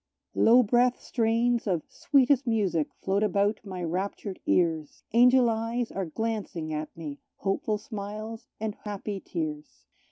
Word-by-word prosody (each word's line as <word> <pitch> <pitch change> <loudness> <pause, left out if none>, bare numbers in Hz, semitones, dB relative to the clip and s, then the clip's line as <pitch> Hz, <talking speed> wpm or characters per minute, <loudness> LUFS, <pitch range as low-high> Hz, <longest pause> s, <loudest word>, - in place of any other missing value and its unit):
Low 245 +2 +6
breathed 245 +3 +3
strains 230 0 +1
of 175 -5 0
sweetest 275 -1 +3
music 195 -9 +1 0.2
float 195 +1 +1
about 205 0 +1
my 185 -3 -6
raptured 190 +3 -3
ears; 160 -4 +1
Angel 250 +1 +6
eyes 230 +1 -1
are 195 -1 -2
glancing 185 -4 -3
at 155 0 -3
me 150 -3 -6 0.2
hopeful 205 +2 -1
smiles 215 +2 -7
and 220 -1 -2
happy 205 -1 -5
tears. 155 -5 -5
210 Hz, 130 wpm, -28 LUFS, 180-230 Hz, 0.2 s, Low